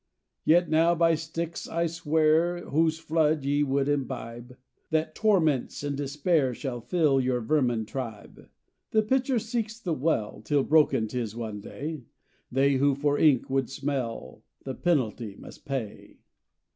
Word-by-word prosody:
"'Yet 175 +2 +5
now 165 +2 +3
by 165 0 +4
Styx 165 +1 -4
I 170 +1 0
swear, 165 +1 +1
Whose 160 +1 +2
flood 155 -2 +1
ye 145 +1 +1
would 140 -1 +1
imbibe, 125 -3 -4 0.3
That 160 0 0
torments 160 - +1
and 145 -1 -2
despair 145 -1 0
Shall 125 -3 -5
fill 140 +1 +2
your 125 -1 0
vermin 120 -2 +1
tribe! 115 -3 -7 0.4
"'The 215 -1 +2
pitcher 260 +3 +1
seeks 225 0 -3
the 180 -7 -2
well, 125 -8 -1
Till 145 +3 +1
broken 150 -8 +3
'tis 115 -1 -4
one 110 -3 -5
day; 150 +6 -6 0.5
They 135 +1 +3
who 140 +1 +3
for 145 +1 0
ink 145 -6 +4
would 135 -1 0
smell, 130 - -4 0.2
The 135 - -4
penalty 120 - -1
must - - -13
pay. 135 -7 -5
145 Hz, 145 wpm, -27 LUFS, 130-165 Hz, 0.5 s, Yet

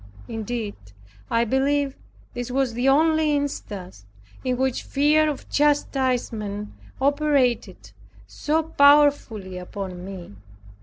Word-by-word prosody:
Indeed, 225 -1 -4 0.5
I 230 0 +2
believe 275 +3 +1 0.4
this 245 0 -5
was 260 -1 0
the 245 +3 +1
only 310 +1 +3
instance 195 - -5 0.4
in 255 -1 0
which 260 -1 0
fear 300 +2 +2
of 290 - -6
chastisement 250 -8 0 0.3
operated 280 -3 +1 0.3
so 315 +2 -1
powerfully 285 - +3
upon 180 -1 -7
me. 185 - -9
260 Hz, 100 wpm, -23 LUFS, 215-290 Hz, 0.5 s, only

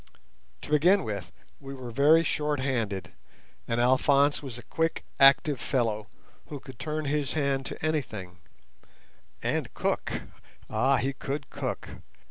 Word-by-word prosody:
To - - -8
begin 180 +7 +5
with, 100 -6 -5 0.3
we 135 0 -8
were 125 -2 -7
very 150 +7 +5
short 150 -3 0
handed, 110 -9 -2 0.5
and 115 0 0
Alphonse 140 +3 +4
was 130 -5 -7
a 120 - -10
quick, 165 +7 -1 0.2
active 135 -1 +6
fellow, 110 -5 0 0.4
who 145 - -6
could 130 -3 -12
turn 155 0 -3
his 145 -1 0
hand 140 -3 0
to - - -5
anything, 105 - -3 1.0
and - - -1
cook—ah, 130 +5 -2
he 135 +2 0
could 140 +1 -5
cook! - - -4
135 Hz, 130 wpm, -28 LUFS, 120-150 Hz, 1.0 s, active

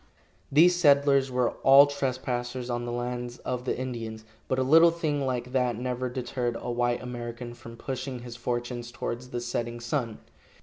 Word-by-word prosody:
These 175 +5 +6
settlers 140 -4 +4
were 125 -1 +1
all 135 +1 +8
trespassers 130 -3 -3
on 120 0 -2
the 120 - -4
lands 120 0 -4
of 125 0 -4
the - - -1
Indians, 115 -4 -5 0.2
but 130 - 0
a 130 - +2
little 165 +5 +7
thing 150 -5 -1
like 125 -1 -2
that 125 -3 +1
never 125 +1 -2
deterred 125 -1 -3
a 120 - -4
white 120 0 0
American 120 -1 -6
from 115 -1 -11
pushing 130 0 -5
his 120 -1 -8
fortunes 120 0 -3
towards 120 +1 -5
the 120 - -3
setting 120 0 -3
sun. 120 -2 -2
125 Hz, 170 wpm, -27 LUFS, 120-130 Hz, 0.2 s, all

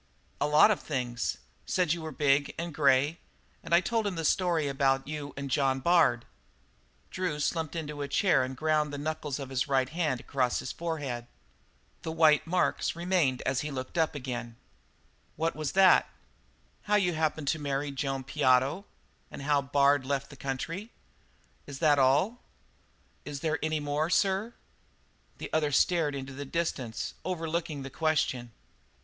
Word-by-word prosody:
"A 145 - +3
lot 150 +8 +6
of 205 - 0
things. 125 -5 -3 0.3
Said 180 -4 +2
you 170 - -5
were 160 0 -5
big 140 0 +1
and 170 -1 -4
grey. 145 +2 +3 0.4
And - - -11
I 170 +1 +6
told 225 +1 0
him 195 - -3
that 165 -1 -3
story 170 -3 +2
about 135 -1 +1
you 150 -1 -5
and 140 -1 -5
John 135 0 +2
Bard." 135 -6 +3 0.9
Drew 180 -5 -2
slumped 160 +1 -1
into 150 -3 -5
a 140 - -2
chair 155 0 +3
and 130 0 -5
ground 155 -1 +1
the 145 - -5
knuckles 150 -1 -3
of 135 -2 -7
his 130 0 0
right 130 -2 +1
hand 155 -6 -1
across 125 -2 0
his - - -4
forehead. 145 -8 -4 0.7
The 160 - -4
white 160 -1 +4
marks 180 -1 0
remained 170 -7 +1
as 130 -1 0
he 150 - -4
looked 130 -2 -6
up 160 -2 +1
again. 120 -4 -5 0.8
"What 165 +2 -1
was 155 -2 -3
that?" 190 -1 +6
"Why, - - -26 0.7
how 210 0 +1
you 185 -4 +2
happened 155 -2 -1
to 160 - 0
marry 140 0 -2
Joan 135 -1 -3
Piotto 135 +5 +2 0.4
and - - -8
how 145 0 +2
Bard 140 0 +3
left 140 +2 -2
the - - -11
country." 150 - -4 0.8
"That 140 -1 -7 0.2
was - - +5
all?" 185 - +2 0.8
"Is 145 -2 -6
there 160 -1 0
any 155 0 0
more, 145 +2 -1
sir?" 195 +5 +1 0.8
The - - -8
other 155 -2 +1
stared 155 0 +2
into 135 -1 -6
the 140 +2 -6
distance, 135 -6 -3
overlooking 165 -4 -3
the 135 - -7
question. 155 -7 0
150 Hz, 165 wpm, -29 LUFS, 135-165 Hz, 0.9 s, lot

